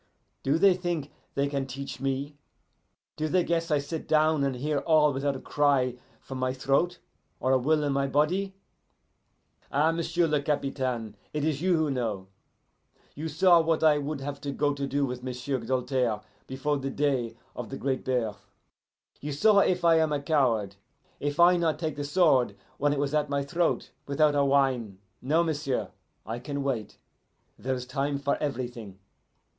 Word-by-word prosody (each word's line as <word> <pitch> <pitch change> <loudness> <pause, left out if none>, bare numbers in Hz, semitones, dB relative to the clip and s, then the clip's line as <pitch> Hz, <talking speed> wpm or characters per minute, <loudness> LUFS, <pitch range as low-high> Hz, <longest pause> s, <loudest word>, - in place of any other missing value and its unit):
Do 140 +4 +2
they 195 +2 +6
think 175 -5 -3 0.2
they 140 0 +1
can 140 -1 -2
teach 135 +1 -6
me? 135 +2 -2 0.8
Do 155 0 -1
they 180 +3 +2
guess 165 0 -1
I 150 - +3
sit 150 +3 -5
down 155 -1 +3
and 135 -2 0
hear 145 +3 -1
all 150 -1 +4
without 135 +1 -1
a - - -5
cry 140 -4 +2 0.3
from 130 -1 -7
my 130 0 0
throat 140 +7 +1 0.4
or 130 - +1
a 130 - +4
will 150 +4 +2
in 145 -1 0
my 140 0 +1
body? 180 +8 +1 1.2
Ah, 150 +4 +3
m'sieu' 170 +1 0
le 150 -2 +1
Capitaine, 130 -6 -2 0.2
it 150 -1 -1
is 155 -2 -1
you 180 -1 +3
who 155 -2 +1
know. 110 -7 -3 0.8
You 155 +3 -5
saw 170 +2 +5
what 160 0 0
I 150 -2 +5
would 145 0 -4
have 140 +1 -5 0.2
go 145 0 +2
to 140 -1 -3
do 140 +1 0
with 125 -1 -5
M'sieu' 130 +1 -3
Doltaire 125 -2 0 0.3
before 140 +2 -1
the 135 0 -3
day 130 -5 -1 0.2
of 125 - -6
the 135 - -5
Great 130 -1 -2
Birth. 110 -6 -2 0.7
You 150 - -5
saw 200 +9 +4
if 180 -3 +2
I 165 -1 +6
am 150 -2 +1
coward 115 - +1 0.4
if 145 +2 -3
I 175 +1 +7
not 165 -3 +1
take 155 -2 -3
the 145 - -4
sword 145 -5 +3 0.2
when 145 +1 +2
it 145 - 0
was 140 +1 -1
at 150 -1 +1
my 140 0 0
throat 170 +4 -1 0.2
without 150 +1 +3
a 145 -1 +3
whine. 135 -7 +1 0.2
No, 155 +6 +2
m'sieu', 145 -5 -2 0.4
I 115 +3 -4
can 140 +2 -4
wait. 125 -7 -3 0.6
Then 130 +1 -1
is 125 -1 -5
a - - -23
time 140 +2 -1
for 140 0 0
everything. 120 -8 -4
140 Hz, 180 wpm, -28 LUFS, 130-155 Hz, 1.2 s, I